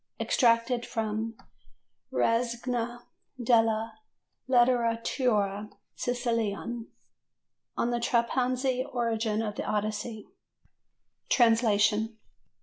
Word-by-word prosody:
Extracted 235 0 +2
from 220 0 -3 0.8
the - - -5
Rassegna 240 0 0 0.4
della 225 -2 +2 0.5
Letteratura 230 -4 +2 0.2
Siciliana. 235 -2 -2 0.9
"On 240 - +1
the 240 - 0
Trapanese 250 +2 +1
Origin 225 -3 0
of 210 -2 -4
the - - -2
Odyssey" 215 +1 -3 1.0
(Translation). 220 -2 +3
230 Hz, 70 wpm, -28 LUFS, 220-240 Hz, 1.0 s, Translation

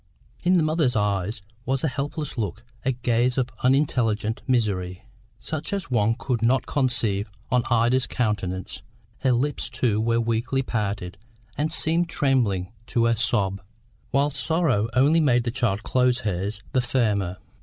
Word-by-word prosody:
In 180 +1 +4
the 165 - +3
mother's 155 -5 +1
eyes 105 0 -1 0.2
was 130 +2 0
a - - +3
helpless 145 +2 -3
look, 110 -1 -3 0.2
a 135 - +2
gaze 120 +1 +1
of 130 -1 +1
unintelligent 120 -5 +1
misery, 100 -7 0 0.3
such 155 +4 -5
as 190 -9 -3
one 115 -1 +2
could 125 -2 -2
not 125 +3 +2
conceive 115 -7 0 0.2
on 125 -1 +4
Ida's 120 +2 +3
countenance; 95 -6 -2 0.4
her 130 - +2
lips, 125 0 0
too, 120 -3 0
were 115 +1 +2
weakly 115 +4 0
parted, 100 -7 -3 0.4
and 155 +2 -1
seemed 165 +2 +1
trembling 115 - +1
to 120 -2 +1
a 115 0 +3
sob, 100 -4 +1 0.5
whilst 140 +1 +1
sorrow 150 -10 +1
only 145 +6 +5
made 125 -6 +3
the 120 - -2
child 115 -5 0
close 125 -1 +2
hers 100 +1 -3
the 130 - +2
firmer. 105 -8 0
120 Hz, 150 wpm, -24 LUFS, 105-135 Hz, 0.5 s, only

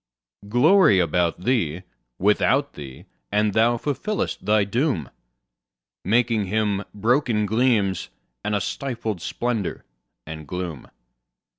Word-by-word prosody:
Glory 130 - +5
about 85 0 +1
thee, 95 - 0 0.3
without 135 +8 +2
thee; 70 -3 -10 0.3
and 105 0 +2
thou 115 +2 +3
fulfillest 150 - -3
thy 105 -1 +3
doom, 100 - -1 0.9
Making 110 0 +1
Him 105 0 0
broken 115 0 +1
gleams, 110 -3 +1 0.3
and 105 - -1
a 100 - 0
stifled 115 -5 -4
splendour 120 -2 -3 0.4
and 80 -1 -8
gloom. 90 -3 -5
105 Hz, 105 wpm, -23 LUFS, 90-120 Hz, 0.9 s, Glory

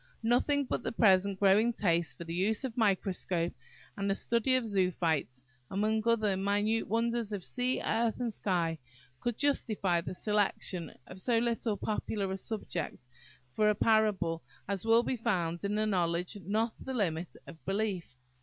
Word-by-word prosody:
Nothing 275 +5 +2
but - - -2
the - - -3
present 195 -3 +3
growing 205 +4 +4
taste 170 - 0
for - - -6
the 165 0 -6
use 205 +7 +1
of 260 -3 -3
the 245 - -5
microscope, 185 -4 +1 0.4
and 200 -1 -2
the 195 - +2
study 235 +4 +1
of 255 -2 +1
zoophytes, 170 - 0 0.3
among 215 +3 +1
other 215 -4 +3
minute 205 +3 +1
wonders 230 0 0
of 200 -4 -4
sea, 250 +1 -1
earth, 230 +1 +1
and 240 -3 -1
sky, 170 -6 0 0.4
could 240 -2 -2
justify 215 -11 +1
the 180 - -6
selection 195 -5 -1
of 185 +1 -9
so 240 +1 +2
little 230 -2 0
popular 210 -2 -2
a 190 - -2
subject 210 - -4 0.5
for 210 +5 +3
a 210 - +3
parable 205 -7 +2 0.3
as 200 0 -2
will 230 +1 +6
be 255 - -1
found 175 -7 -1
in 200 +1 -1
"Knowledge 180 -3 0
not 220 +3 +1
the 265 - -4
Limit 175 -6 -1
of 160 - -12
Belief." 195 -8 -2
205 Hz, 165 wpm, -31 LUFS, 180-225 Hz, 0.5 s, will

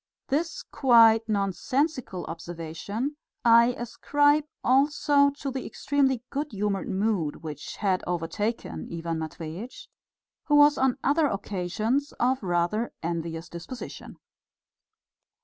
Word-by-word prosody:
This 330 - -1
quite 230 -3 +5
nonsensical 215 - -1
observation 170 - -5 0.3
I 235 +1 +6
ascribe 290 +5 +2 0.2
also 280 +2 +4
to 280 -1 -5
the 265 0 -4
extremely 265 -4 0
good 285 -1 -3
humoured 200 -1 -1
mood 190 -7 -1
which 150 -2 -7
had 190 -3 0
overtaken 180 +7 -3
Ivan 165 -1 -3
Matveitch, 160 +8 -7 0.6
who 295 - +3
was 290 0 +6
on 265 -1 +2
other 295 +2 +3
occasions 215 +6 -2
of 255 +2 +1
rather 180 +5 0
envious 165 0 -3
disposition. 175 +9 -8
225 Hz, 105 wpm, -27 LUFS, 175-275 Hz, 0.6 s, I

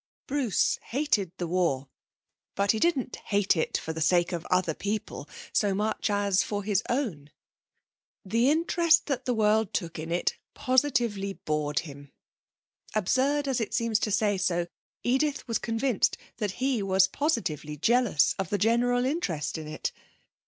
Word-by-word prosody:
Bruce 265 -7 +1
hated 235 - 0
the 175 - -2
war; 165 -6 0 0.7
but 200 0 +3
he 220 - -1
didn't 285 -6 0
hate 200 -2 +1
it 160 - 0
for 160 - -5
the 160 - -5
sake 175 +3 +3
of 170 -2 -4
other 180 -3 +1
people 205 +6 -4 0.2
so 200 -2 +2
much 215 +2 -1
as 200 -1 +2
for 205 -1 -3
his 200 -1 +1
own. 210 - -2 1.0
The 230 +6 +2
interest 335 +1 +3
that 270 -3 -2
the 250 - +1
world 215 -1 +2
took 170 -3 -3
in 160 +1 -5
it 175 - 0 0.2
positively 240 -7 +1
bored 150 -4 -1
him 145 -3 -11 0.8
absurd 270 +8 +1
as 260 -3 0
it 220 - -2
seems 230 -2 +1
to 215 - -1
say 205 -1 +1
so, 175 -2 +1 0.4
Edith 275 +3 0
was 230 - 0
convinced 230 -1 0 0.2
that 210 -4 -2
he 255 -1 0
was 190 -1 +3
positively 155 - -2
jealous 235 - +3
of 190 - -2
the 205 - 0
general 245 +4 +2
interest 175 - -2
in 160 -2 -5
it! 155 0 -3
210 Hz, 155 wpm, -28 LUFS, 175-245 Hz, 1.0 s, but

